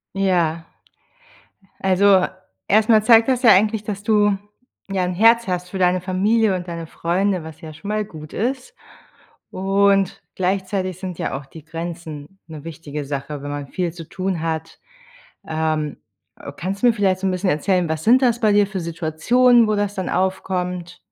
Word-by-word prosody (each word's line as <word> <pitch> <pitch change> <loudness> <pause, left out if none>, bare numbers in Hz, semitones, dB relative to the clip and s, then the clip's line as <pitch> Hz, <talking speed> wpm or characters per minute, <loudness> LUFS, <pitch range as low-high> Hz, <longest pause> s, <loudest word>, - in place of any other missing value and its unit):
Ja. 170 -4 +1 1.1
Also 190 0 +4 0.4
erst 215 +2 +3
mal 215 -2 +6
zeigt 225 0 +6
das 255 -1 +1
ja 230 - +8
eigentlich, 210 +2 +3
dass 205 -1 -5
du, 205 -2 +3 0.5
ja, 195 -2 0
'n 180 0 -1
Herz 230 +4 +4
hast 180 -1 -3
für 190 - -5
deine 180 0 +2
Familie 200 +3 +1
und 180 0 -5
deine 170 -1 -6
Freunde, 180 +2 -1
was 160 -1 -11
ja 155 -1 -9
schon 200 +7 -9
mal 215 0 -1
gut 155 -5 -11
ist. 255 +4 -3 0.8
Und 195 0 +2
gleichzeitig 185 0 -2
sind 185 -3 -6
ja - - -2
auch 135 - -10
die 155 +3 -14
Grenzen 165 0 -7
'ne 155 -3 -9
wichtige 150 -2 -6
Sache, 140 +1 -5
wenn 145 - -6
man 145 -1 -5
viel 175 +3 -2
zu 165 -2 -10
tun 185 -3 -3
hat. 160 0 -4 0.7
Ähm, 155 -2 -2 0.4
ö 140 - -7
kannst 190 +5 -4
du - - +5
mir - - +5
vielleicht 190 -3 +1
so 195 - -1
'n - - +2
bisschen 185 +1 0
erzählen: 175 +3 +1
Was 160 0 -3
sind 250 +4 +5
das 240 -2 +2
bei 215 -2 +3
dir 205 0 +4
für 195 -2 -5
Situationen, 180 +10 +3
wo 215 - +2
das 205 0 -1
dann 190 -2 -3
aufkommt? 180 -1 -2
185 Hz, 180 wpm, -21 LUFS, 165-205 Hz, 1.1 s, ja